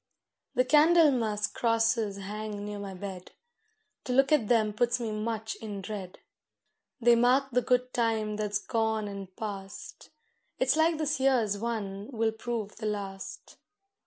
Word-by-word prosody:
The 255 - +3
Candlemas 280 -8 +4
crosses 225 -3 +1
hang 205 +1 -5
near 210 0 -5
my 195 -1 -6
bed; 185 -1 -8 0.7
To 250 - -1
look 270 +2 +4
at 280 -9 +3
them 220 -3 +3
puts 240 +3 +1
me 230 -2 -3
much 220 +1 -3
in 210 -3 -6
dread, 195 -2 -6 0.8
They 240 0 +5
mark 255 +3 +3
the 250 +1 +2
good 250 +1 +1
time 220 -3 0
that's 210 -1 -1
gone 220 0 -1
and 195 -2 -8
past: 195 -3 -7 0.5
It's 260 +2 +2
like 320 +1 +3
this 300 -2 -1
year's 240 -7 +2
one 210 -2 -4
will 225 -2 +1
prove 220 -2 -5
the 215 - -3
last. 195 -2 -6
220 Hz, 145 wpm, -29 LUFS, 205-245 Hz, 0.8 s, They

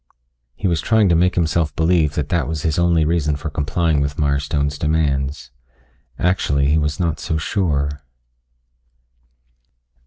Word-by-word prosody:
He 95 - -2
was 85 -3 0
trying 110 -4 +3
to 85 - +4
make 90 +2 +2
himself 80 -2 0
believe 80 -2 +2
that 75 -1 -2
that 85 - 0
was 80 -2 -4
his 80 0 0
only 85 -2 +3
reason 75 -2 0
for 75 +2 -6
complying 80 +1 0
with 70 +1 -2
Mirestone's 70 0 -1
demands. 75 -3 -1 0.7
Actually 70 -6 +1
he 80 - +3
was 75 -1 -2
not 85 -3 -1
so 80 - -2
sure.... 75 -5 -1
80 Hz, 145 wpm, -20 LUFS, 70-85 Hz, 0.7 s, to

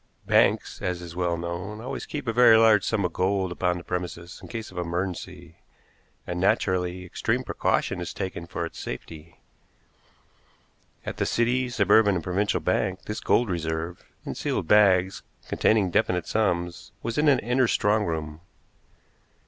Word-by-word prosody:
Banks, - - +2
as 90 -1 -2
is 85 -1 -9
well 85 -1 0
known, 85 +5 -5
always 130 +4 -6
keep 145 -4 -5
a 115 - 0
very 120 -2 +7
large 110 -3 +5
sum 105 -4 0
in 90 - -1
gold 95 +1 0
upon 90 0 0
the 85 - -8
premises 90 -1 -5
in - - -10
case 115 -3 -6
of 90 - -6
emergency, 90 +1 -4 0.7
and, 90 0 -4
naturally, 90 -1 0
extreme 90 - -1
precaution 90 - -1
is 90 - -4
taken 85 -3 -5
for 85 - -3
its 80 - -9
safety. 80 +5 -8 1.7
At - - -5
the - - 0
City, 125 +2 +1
Suburban 105 -2 +4
and 85 - -2
Provincial 95 +4 0
Bank 95 0 -1
this 105 - -5
gold 120 - +2
reserve, 80 0 -3 0.2
in - - -4
sealed - - -2
bags, 95 -2 +4 0.3
containing 105 -5 +2
definite 90 0 +1
sums, 90 -5 -1
was 115 +4 -2
in 150 - +3
an 140 -2 +6
inner 125 +2 +1
strong 105 0 +2
room. 80 -3 -4
90 Hz, 155 wpm, -26 LUFS, 85-110 Hz, 1.7 s, very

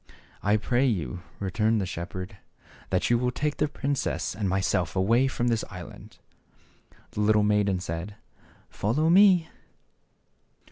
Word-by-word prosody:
"I 105 +2 +3
pray 120 +5 +1
you," 90 - -2 0.2
returned 105 +3 +1
the 95 - -1
shepherd, 90 +2 -6 0.3
" - - -24
that - - 0
you 120 - +4
will 125 0 +1
take 145 +4 -2
the 150 - +1
princess 140 -1 -2
and 105 -3 -1
myself 95 -2 0
away 115 +8 +3
from 120 -2 -1
this 115 -2 0
island."' 90 -2 -11 0.9
The - - -6
little 105 0 +4
maiden 105 -2 +2
said, 90 +3 -5 0.3
" - - -27
Follow 150 +11 0
me." 185 -3 +6
105 Hz, 145 wpm, -26 LUFS, 95-125 Hz, 0.9 s, me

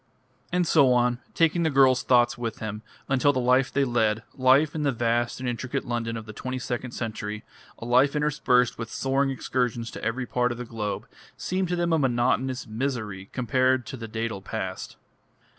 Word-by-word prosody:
And 180 0 +2
so 140 -6 +5
on, 120 0 +2 0.2
taking 165 +1 +3
the 160 - +2
girls' 135 -3 +4
thoughts 120 -1 +3
with 115 -2 -4
him, 105 -1 -5 0.3
until 135 +1 +3
the 130 - -1
life 130 +1 +3
they 140 - +2
led, 115 -3 +1
life 135 +4 +4
in 155 - -3
the 145 -2 +2
vast 120 0 0
and 130 - -4
intricate 130 +3 -3
London 115 -1 -2
of 110 - -7
the 110 - -9
twenty 130 +4 -4
second 125 0 -4
century, 105 -2 -4 0.3
a - - -8
life 130 +4 +3
interspersed 135 -6 +2
with 115 -1 -4
soaring 135 +1 0
excursions 125 -3 -2
to - - -9
every 125 +3 -1
part 125 +1 0
of 120 - -5
the 125 - -5
globe, 110 -3 -4 0.3
seemed 185 0 -1
to 180 - -1
them 175 -1 0
a 160 - +3
monotonous 130 0 +1
misery 110 -5 -4
compared 130 0 +1
with 130 - -7
the 115 - -6
dædal 110 -2 -4
past. - - -5
125 Hz, 190 wpm, -26 LUFS, 115-135 Hz, 0.3 s, so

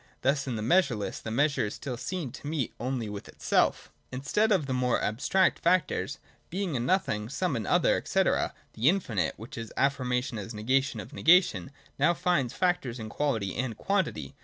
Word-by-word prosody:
Thus 135 +1 +1
in 125 - -2
the 110 - -3
measureless 125 - +1
the - - -6
measure 135 -1 +1
is 105 - -6
still 130 -3 -5
seen 160 +2 -4
to 140 - -9
meet 150 -5 -2
only 125 -1 -2
with 105 -1 -7
itself. - - 0 0.2
111.] 130 - -5
Instead 210 +11 +1
of 185 -8 +3
the 135 - -2
more 125 -1 +1
abstract 140 - +1
factors. 175 -1 +1 0.3
Being 185 -3 -2
and 120 0 -1
Nothing, 110 - 0
some 165 +2 -1
and 110 -4 -3
other, - - +3
&c., - - +2
the - - +1 0.4
Infinite, 135 - 0
which 115 +4 -8
is 115 -1 -7
affirmation 125 -4 0
as 115 +3 -6
a - - -9
negation 130 +6 +1
of - - -9
negation, 165 - +4 0.3
now 165 +5 +4
finds 155 -11 +1
its - - -13
factors 175 -10 +1
in 110 -1 -6
quality 115 -8 -1
and 120 -2 -2
quantity. 190 - -1
130 Hz, 190 wpm, -28 LUFS, 115-165 Hz, 0.4 s, negation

